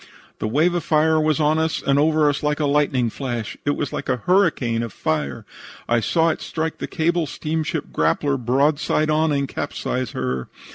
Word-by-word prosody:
"The - - -1
wave 155 +10 +2
of 175 - -1
fire 155 0 +3
was 155 0 +1
on 155 +1 +2
us 160 0 0
and 140 0 +2
over 155 0 +3
us 145 -1 0
like 150 0 0
a 150 - +1
lightning 140 -5 +1
flash. 120 -5 -4
It 145 - +1
was 145 - -3
like - - -4
a 125 -3 -1
hurricane 160 -12 +2
of 115 -2 -4
fire. 75 -6 -2 0.4
I 120 0 +3
saw 165 +7 +2
it - - -2
strike 160 0 -3
the - - -4
cable 170 0 0
steamship 155 +2 -3
Grappler 125 - +1
broadside 145 +4 +2
on 155 +1 +2
and 140 -1 0
capsize 125 -1 -3
her. 65 -1 -3
145 Hz, 190 wpm, -22 LUFS, 125-160 Hz, 0.4 s, fire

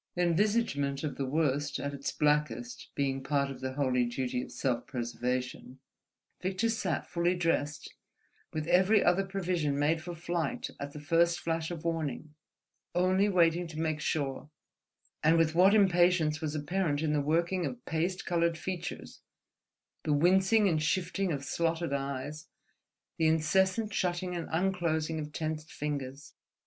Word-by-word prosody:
Envisagement 170 -6 +1
of 150 - -2
the 135 - -2
worst 145 0 0
at 140 0 -4
its 140 0 -3
blackest 150 -6 0
being 135 -1 0
part 140 0 0
of 130 -1 -9
the 130 0 -3
holy 130 -3 +1
duty 125 +1 -2
of - - -8
self 125 -3 -1
preservation, 125 0 -3 0.6
Victor 190 +5 0
sat 225 - -1
fully 175 +1 0
dressed, 165 -4 -1 0.6
with 155 -1 -3
every 190 +5 +4
other 180 +3 +3
provision 180 -7 -1
made 155 +3 +2
for 175 +1 -6
flight 170 -2 -2
at 140 0 -6
the 150 - -7
first 170 +3 +2
flash 165 0 -2
of 170 -2 -6
warning, 155 -2 -2 0.6
only 185 +3 +3
waiting 175 -2 +3
to 160 -1 -7
make 155 -2 -1
sure, 145 -2 -2 0.7
and 160 +2 +5
with 160 -1 +3
what 190 +5 +6
impatience 175 -5 +3
was 155 -1 -2
apparent 150 0 -1
in 155 -1 +1
the 150 - +2
working 170 +5 +1
of 245 0 -8
paste 175 +3 -1
coloured 170 -2 +1
features, 180 +1 -6 0.8
the 150 - 0
wincing 190 +7 +4
and 160 -4 +1
shifting 185 +3 0
of 140 -2 -3
slotted 165 +2 -1
eyes, 140 +3 -4 0.7
the 160 - +4
incessant 190 +7 +2
shutting 180 0 -1
and 170 - -4
unclosing 165 -3 0
of 150 -1 -5
tensed 155 -1 -4
fingers. 140 -2 -5
160 Hz, 150 wpm, -30 LUFS, 145-175 Hz, 0.8 s, what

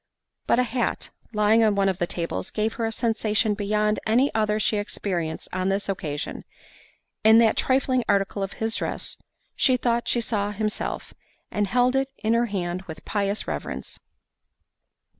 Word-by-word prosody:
But - - +4
a 250 - +4
hat, 240 0 -2 0.2
lying 215 +1 +4
on 215 -2 +3
one 195 0 +2
of 190 -2 0
the 175 - 0
tables, 170 -1 -3
gave 215 +1 -1
her 225 - +1
a - - -2
sensation 220 -1 +1
beyond 210 +1 0
any 250 +6 +3
other 215 -1 +1
she 215 0 +2
experienced 175 -5 -3
on 185 +1 0
this 195 +1 -1
occasion—in 195 +5 -2
that 230 -1 +5
trifling 260 -1 +2
article 200 0 +1
of 195 0 -3
his 225 0 -1
dress, - - -3 0.4
she 255 -1 +4
thought 235 -1 0
she 240 - +2
saw 210 -3 -1
himself, 215 +1 -3 0.4
and 205 -1 0
held 250 +4 +2
it 270 0 +1
in 220 0 0
her 235 +1 +2
hand 180 -3 -2
with 160 - -9
pious 200 0 -1
reverence. - - -5
215 Hz, 160 wpm, -25 LUFS, 200-230 Hz, 0.4 s, that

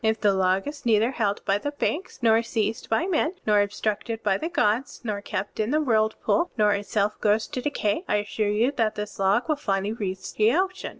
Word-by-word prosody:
If 220 0 +1
the 205 -2 +3
log 190 +2 +1
is 290 -1 -7
neither 225 0 +3
held 210 -5 -1
by 200 0 +2
the 290 - -3
banks, 300 -2 -3
nor 225 0 +5
seized 225 -1 -2
by 270 +10 +1
men, 350 -1 0
nor 210 -1 +4
obstructed 215 +2 -2
by 195 -2 +1
the 325 - -3
gods, 265 -6 0
nor 210 -3 -3
kept 200 +1 -5
in 215 +1 0
the 300 +3 +2
whirlpool, 230 +6 +1
nor 210 -2 +4
itself 205 +1 -1
goes 215 +1 +2
to 265 -4 -4
decay, 275 - -1
I - - +1
assure 210 0 -1
you 225 +6 +2
that 225 -3 +1
this 210 -1 -6
log 195 +5 +2
will 305 -2 +1
finally 200 -5 -1
reach 190 -4 -5
the 220 +3 +3
ocean. 375 +1 -1
220 Hz, 215 wpm, -25 LUFS, 205-255 Hz, -, nor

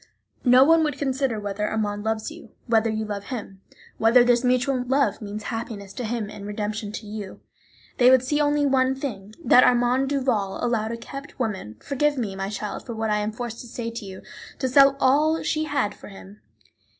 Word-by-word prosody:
No 250 +1 +7
one 325 +3 +5
would 295 -3 -1
consider 265 -4 -1
whether 205 0 -3
Armand 205 -1 -2
loves 220 +5 -2
you, 330 +1 -12 0.2
whether 225 -1 +2
you 220 0 -2
love 205 -1 -5
him, 205 -6 -7 0.4
whether 230 +2 +6
this 245 0 +3
mutual 255 +1 +1
love 265 -6 +1
means 210 0 -6
happiness 220 -4 -6
to 250 - -5
him 225 -1 -2
and 205 -1 -9
redemption 210 0 -4
to 220 - -6
you; 210 -2 -7 0.6
they 250 0 +7
would 260 -1 +5
see 295 +3 0
only 290 0 +2
one 265 -1 +2
thing, 215 -7 -6
that 250 - +7
Armand 250 +2 +3
Duval 250 -9 0
allowed 225 -2 0
a 230 - -4
kept 275 +4 -9
woman 200 - -3
(forgive 290 +1 0
me, 210 -6 -3
my 195 0 -3
child, 210 0 -5
for 235 - -7
what 220 -1 -1
I 210 - +2
am 210 +1 -2
forced 235 0 -6
to 240 - -11
say 230 0 -5
to 230 -1 -7
you) 190 -1 -9 0.3
to 260 - -1
sell 275 +1 +5
all 305 +5 +3
she 310 0 0
had 280 -8 -1
for - - -13
him. 195 +1 -13
235 Hz, 200 wpm, -24 LUFS, 210-265 Hz, 0.6 s, No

